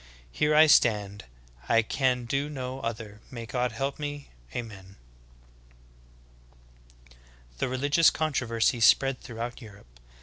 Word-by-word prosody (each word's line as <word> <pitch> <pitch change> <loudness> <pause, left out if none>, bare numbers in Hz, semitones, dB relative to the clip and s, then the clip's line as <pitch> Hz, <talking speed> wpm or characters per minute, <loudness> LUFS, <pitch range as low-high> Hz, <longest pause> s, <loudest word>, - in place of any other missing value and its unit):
Here 150 - +1
I 155 +1 +8
stand, 105 - +2 0.4
I 115 0 +4
can 125 +1 0
do 140 +4 -2
no 130 -2 -5
other, 110 -3 -6
may 120 -3 -7
God 125 +1 -2
help 135 +6 -4
me! 145 -1 -6 0.2
Ameri!" 100 - -8 2.1
8. - - -22 0.5
The - - -1
religious 145 +5 +3
controversy 125 -6 0
spread 135 +3 +4
throughout 120 +1 -7
Europe. 100 - -15
120 Hz, 115 wpm, -27 LUFS, 110-140 Hz, 2.1 s, I